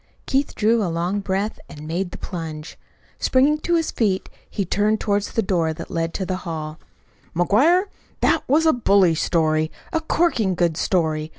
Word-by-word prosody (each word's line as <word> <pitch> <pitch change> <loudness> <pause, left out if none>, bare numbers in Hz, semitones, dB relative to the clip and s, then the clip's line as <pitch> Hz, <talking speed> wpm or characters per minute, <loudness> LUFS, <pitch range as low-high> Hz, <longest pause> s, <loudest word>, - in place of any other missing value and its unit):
Keith 275 +1 0
drew 225 +2 +2
a 180 - -1
long 175 +4 -1
breath 195 +2 -2
and 150 0 -10
made 175 +3 -2
the - - -9
plunge. 160 -3 -6 0.4
Springing 280 +4 +3
to 345 +2 0
his 325 -1 0
feet 200 -5 0 0.2
he 200 - -2
turned 210 +4 +1
toward 205 -1 +1
the 225 +2 -2
door 170 -4 0
that 165 - -9
led 165 0 -1
into 190 +3 -4
the 185 0 -2
hall. 160 -3 -6 0.6
"McGuire, 265 - +4 0.4
that - - +3
was 305 +5 +3
a 320 - +5
bully 200 -7 +4
story 155 -1 +1 0.2
a 325 - +1
corking 280 - +1
good 170 -2 +1
story. 155 -3 0
190 Hz, 175 wpm, -22 LUFS, 165-225 Hz, 0.6 s, a